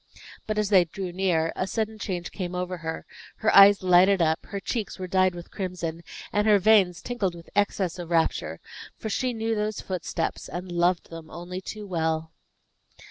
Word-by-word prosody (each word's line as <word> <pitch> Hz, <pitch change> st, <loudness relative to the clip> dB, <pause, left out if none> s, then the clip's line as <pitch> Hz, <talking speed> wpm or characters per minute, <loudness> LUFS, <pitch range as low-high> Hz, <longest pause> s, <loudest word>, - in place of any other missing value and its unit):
But, 215 Hz, 0 st, -2 dB
as 210 Hz, -2 st, +1 dB
they 185 Hz, -4 st, +6 dB
drew 180 Hz, +2 st, -6 dB
near, 175 Hz, -3 st, 0 dB
a 185 Hz, -, -2 dB
sudden 220 Hz, +1 st, -2 dB
change 180 Hz, -4 st, -4 dB
came 180 Hz, -2 st, -5 dB
over 180 Hz, 0 st, -3 dB
her; 160 Hz, -1 st, -5 dB, 0.3 s
her 220 Hz, -, +1 dB
eyes 200 Hz, 0 st, +8 dB
lighted 185 Hz, +2 st, +5 dB
up, 160 Hz, -1 st, +1 dB
her 200 Hz, -, -4 dB
cheeks 215 Hz, +2 st, -3 dB
were 185 Hz, -, -5 dB
dyed 185 Hz, 0 st, +2 dB
with 175 Hz, 0 st, -10 dB
crimson, 175 Hz, -4 st, -4 dB, 0.3 s
and 210 Hz, +1 st, +2 dB
her 210 Hz, -1 st, +6 dB
veins 195 Hz, -3 st, +4 dB
tingled 205 Hz, -8 st, -2 dB
with 170 Hz, -1 st, -13 dB
excess 195 Hz, -3 st, 0 dB
of 170 Hz, -1 st, -6 dB
rapture 165 Hz, -1 st, 0 dB, 0.4 s
for 220 Hz, -, -5 dB
she 255 Hz, +5 st, 0 dB
knew 225 Hz, -1 st, -2 dB
those 215 Hz, -1 st, -2 dB
footsteps, 180 Hz, -3 st, -3 dB
and 180 Hz, +1 st, -6 dB
loved 175 Hz, 0 st, +1 dB
them, 165 Hz, -1 st, -9 dB
only 180 Hz, +2 st, -7 dB
too 210 Hz, +2 st, -7 dB
well. 160 Hz, -3 st, -1 dB
185 Hz, 185 wpm, -26 LUFS, 175-205 Hz, 0.4 s, eyes